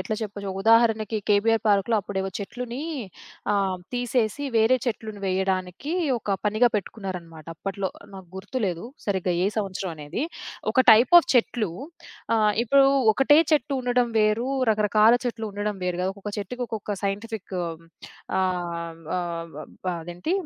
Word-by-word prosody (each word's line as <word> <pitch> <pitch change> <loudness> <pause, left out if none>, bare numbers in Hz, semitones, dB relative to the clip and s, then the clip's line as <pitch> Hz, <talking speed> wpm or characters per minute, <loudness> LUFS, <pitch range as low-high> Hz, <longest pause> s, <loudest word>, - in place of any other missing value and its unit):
ఎట్లా 215 - -2
చెప్పొచ్చు, 205 -1 -5
ఉదాహరణకి 225 -1 +4
కేబీఆర్ 220 +2 +3
పార్క్‌లో 205 +2 +3
అప్పుడేవో 190 -1 -3
చెట్లుని 245 +5 -5 0.7
ఆహ్, 195 -2 0 0.2
తీసేసి 245 +2 0
వేరే 225 +4 +4
చెట్లుని 215 -3 -4
వేయడానికి 190 - -1 0.3
ఒక 200 -3 -1
పనిగా 225 +3 +3
పెట్టుకున్నారన్నమాట. 180 -6 -6
అప్పట్లో 195 +1 -3 0.2
నాకు 190 -2 -11
గుర్తులేదు 195 -3 -3 0.2
సరిగ్గా 190 -3 0
ఏ - - +3
సంవత్సరం 190 -3 -3
అనేది. 150 - -4 0.5
ఒక 260 - +4
టైప్ 235 +8 +4
ఆఫ్ - - -6
చెట్లు 230 -5 +2 0.7
ఆహ్, 215 -1 +3
ఇప్పుడు 275 +3 +5 0.3
ఒకటే 290 +4 +5
చెట్టు 285 -2 +2
ఉండడం 245 -1 +2
వేరు, 215 +4 +2 0.2
రకరకాల 215 +2 +4
చెట్లు 230 -2 -3
ఉండడం 205 +1 -2
వేరు 180 -1 -1
కదా. 185 - 0
ఒక్కొక్క 205 +1 -7
చెట్టుకి 245 +5 -5
ఒక్కొక్క 215 -1 -4
సైంటిఫిక్ 200 -1 -4 0.8
ఆహ్, 170 -3 -3 0.2
ఆహ్, 170 -1 -4 0.5
అదేంటి? 175 - -4
205 Hz, 130 wpm, -25 LUFS, 190-230 Hz, 0.8 s, ఇప్పుడు